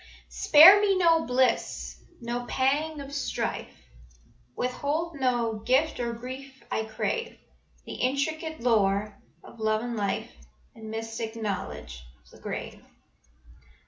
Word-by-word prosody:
"Spare 315 - +8
me 395 -2 +3
no 330 -3 +3
bliss, 255 +1 0 0.2
no 240 +1 -4
pang 295 +4 0
of 280 0 -9
strife, 285 - -3 0.9
Withhold 290 +5 -2
no 240 -4 0
gift 270 +8 +1
or 235 -1 -1
grief 260 +3 -9
I 220 - -1
crave, 460 - -3 0.5
The - - -7
intricate 315 +4 -2
lore 210 -3 +2 0.3
of 235 - -14
love 215 0 0
and 240 -1 -4
life 200 -3 -2 0.4
And 220 -1 -10
mystic 225 0 -5
knowledge 195 - -5 0.2
of - - -23
the - - -16
grave." - - -6
250 Hz, 120 wpm, -27 LUFS, 220-295 Hz, 0.9 s, Spare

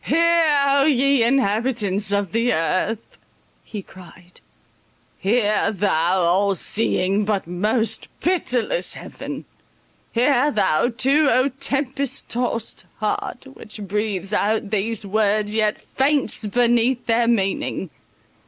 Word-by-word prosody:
"Hear, 330 -1 +3
O 275 0 +3
ye 275 -2 +3
inhabitants 220 -4 0
of 200 -3 -1
the 230 +3 +1
earth," 185 +7 -2 0.4
he 210 -3 -8
cried, 180 -1 -15 0.8
"hear 210 +1 +1
thou, 185 -3 +1
all 190 +3 +2
seeing, 200 0 +1
but 205 -1 -1
most 210 +7 -1
pitiless 345 - 0
Heaven! - - -8 0.7
hear 255 +3 +2
thou 205 - +1
too, 275 +5 +2
O 255 +2 +2
tempest 275 0 -1
tossed 235 -2 -1
heart, 215 +4 -3
which 215 -3 -9
breathes 200 -1 -3
out 210 0 0
these 215 +1 -2
words, 210 +1 0
yet 215 -1 +1
faints 270 -5 0
beneath 240 +2 +1
their 230 0 +2
meaning! 195 -5 -1
220 Hz, 110 wpm, -21 LUFS, 200-260 Hz, 0.8 s, Hear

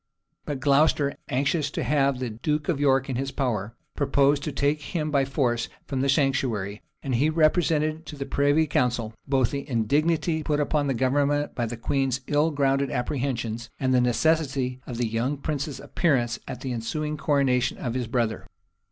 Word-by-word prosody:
But 145 -3 -3
Glocester, 140 +1 +3 0.2
anxious 140 +3 +1
to - - -3
have 140 0 +2
the 125 -2 -3
duke 150 - -2
of 155 -5 +1
York 135 -2 +3
in 130 -3 -2
his 135 +1 -2
power, 115 -6 -2 0.2
proposed 140 0 +2
to 155 - -2
take 145 +2 0
him 155 0 -3
by 140 -2 +3
force 125 -4 0 0.2
from 135 -2 -2
the 135 - +1
sanctuary; 130 -8 0 0.2
and 135 - -2
he 135 +6 +3
represented 155 0 +2
to 150 - -7
the 140 -1 -4
privy 145 +3 +2
council 120 -5 0
both 130 -3 +2
the 140 +1 -5
indignity 155 +7 +1
put 150 -1 0
upon 145 0 +1
the 135 - 0
government 145 +3 +1
by 120 -2 -1
the 120 +1 -5
queen's 130 +2 0
ill 150 +3 +2
grounded 140 -2 +1
apprehensions, 120 -3 -2
and 130 -1 +1
the 125 - +4
necessity 130 -1 +1
of 120 - -5
the 120 - 0
young 120 +6 -1
prince's 145 -1 -3
appearance 125 -8 0
at 125 -2 -6
the 130 -2 -3
ensuing 150 +7 -3
coronation 140 -4 +1
of 120 - -3
his 125 -2 -2
brother. 115 -2 -1
135 Hz, 180 wpm, -25 LUFS, 125-150 Hz, 0.2 s, the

